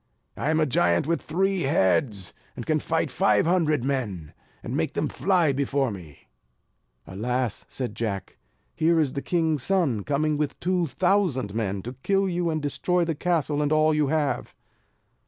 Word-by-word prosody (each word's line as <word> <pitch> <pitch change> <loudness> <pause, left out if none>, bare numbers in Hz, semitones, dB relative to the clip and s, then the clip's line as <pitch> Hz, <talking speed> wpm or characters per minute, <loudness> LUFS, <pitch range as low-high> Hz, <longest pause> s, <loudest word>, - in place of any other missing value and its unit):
I 145 - -2
am 160 0 +2
a 155 - +3
giant 85 - +2
with 165 +2 0
three 190 +3 0
heads; 100 - +1 0.2
and - - -6
can - - +1
fight - - -1
five 105 +4 +3
hundred 160 -6 +2
men, 110 - -3 0.3
and - - -4
make - - -1
them - - 0
fly 180 -5 +2
before 135 -1 0
me." 85 -7 -11 0.8
"Alas!" 120 +4 -2
said 125 -5 -4
Jack, 100 -5 -4 0.3
"Here 165 +1 +2
is 145 -5 +1
the 140 - -3
king's 160 -4 0
son, 145 - +1
coming 150 +1 0
with 150 -1 -2
two 180 -1 0
thousand 150 - +1
men, 100 -3 -2
to 125 - -6
kill 195 +3 +2
you, 175 -1 -1
and 155 -2 -2
to - - -2
destroy 175 +4 0
the 165 - -1
castle 155 -2 0
and 145 0 0
all 155 0 +4
that 155 - 0
you 150 -2 +2
have." 150 -1 -1
145 Hz, 175 wpm, -25 LUFS, 120-165 Hz, 0.8 s, all